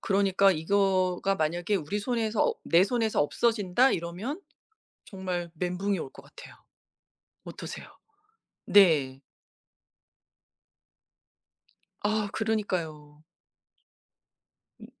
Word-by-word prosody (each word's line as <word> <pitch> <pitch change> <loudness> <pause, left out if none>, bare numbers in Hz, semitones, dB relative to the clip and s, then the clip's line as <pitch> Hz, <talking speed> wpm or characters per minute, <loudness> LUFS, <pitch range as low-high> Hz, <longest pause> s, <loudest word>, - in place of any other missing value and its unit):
그러니까 195 0 +3
이거가 185 +2 +1
만약에 175 +4 -1
우리 190 +4 -3
손에서 225 -1 -1
없 - - 0
'내 170 +3 +4
손에서 225 -4 0
없어진다.' 225 - +2
이러면 185 - -4 0.6
정말 180 -3 -5
멘붕이 180 +4 -2
올 135 - -6
것 - - -14
같아요. - - -14 0.9
어떠세요? - - -8 0.8
네. 150 -9 +4 2.8
아 215 0 0
그러니까요. 165 -9 -3 1.6
음. - - -11
190 Hz, 195 characters per minute, -27 LUFS, 170-210 Hz, 2.8 s, 내